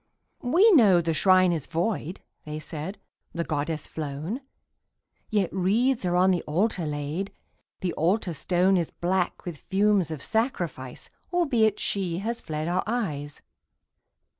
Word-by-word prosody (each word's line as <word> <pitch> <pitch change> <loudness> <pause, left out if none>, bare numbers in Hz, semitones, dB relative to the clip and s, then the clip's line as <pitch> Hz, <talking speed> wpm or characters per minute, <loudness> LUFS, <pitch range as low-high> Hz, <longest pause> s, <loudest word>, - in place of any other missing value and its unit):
"We 355 - +5
know 215 - +6
the 165 -1 0
Shrine 185 +2 +5
is 160 -5 -2
void," 175 0 -2 0.2
they 150 0 -5
said, 155 +5 -6 0.4
"The 170 - -1
Goddess 155 0 -2
flown 155 - -5 0.9
Yet 205 -4 0
wreaths 215 +6 +2
are 175 0 +1
on 185 +1 +5
the 180 - +1
Altar 175 +2 0
laid 150 +6 -3 0.5
The 180 -2 -1
Altar 180 +2 +1
Stone 180 +5 +2
Is 170 -3 -1
black 180 +1 -1
with 170 -5 -6
fumes 200 -3 +3
of 155 -4 -5
sacrifice, 175 - -2 0.2
Albeit 245 - +2
She 185 -4 -1
has 230 +5 -3
fled 155 0 -4
our 180 +2 +1
eyes. 150 -12 -3
180 Hz, 140 wpm, -26 LUFS, 160-210 Hz, 0.9 s, know